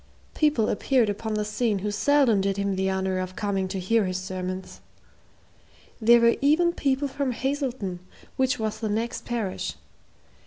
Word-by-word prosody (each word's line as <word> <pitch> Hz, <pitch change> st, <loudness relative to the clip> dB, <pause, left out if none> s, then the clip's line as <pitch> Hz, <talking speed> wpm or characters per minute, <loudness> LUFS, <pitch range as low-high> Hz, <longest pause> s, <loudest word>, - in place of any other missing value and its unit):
People 295 Hz, -8 st, +2 dB
appeared 245 Hz, 0 st, +2 dB
upon 215 Hz, +1 st, -4 dB
the 210 Hz, 0 st, -1 dB
scene 215 Hz, 0 st, 0 dB
who 210 Hz, -, 0 dB
seldom 250 Hz, -2 st, +3 dB
did 195 Hz, 0 st, -1 dB
him 200 Hz, -1 st, 0 dB
the 190 Hz, 0 st, 0 dB
honor 190 Hz, -1 st, -1 dB
of 185 Hz, 0 st, -5 dB
coming 195 Hz, -2 st, -1 dB
to 190 Hz, +1 st, -4 dB
hear 215 Hz, +3 st, +2 dB
his 185 Hz, 0 st, -2 dB
sermons. 185 Hz, 0 st, -5 dB, 1.2 s
There 235 Hz, +2 st, +6 dB
were 235 Hz, 0 st, +4 dB
even 325 Hz, +5 st, +3 dB
people 275 Hz, -2 st, 0 dB
from 270 Hz, -1 st, -2 dB
Hazelton, 255 Hz, -9 st, -2 dB, 0.4 s
which 260 Hz, -1 st, +1 dB
was 220 Hz, -1 st, -3 dB
the 220 Hz, -1 st, -2 dB
next 225 Hz, +3 st, -2 dB
parish. 225 Hz, -6 st, -3 dB
215 Hz, 160 wpm, -25 LUFS, 190-255 Hz, 1.2 s, There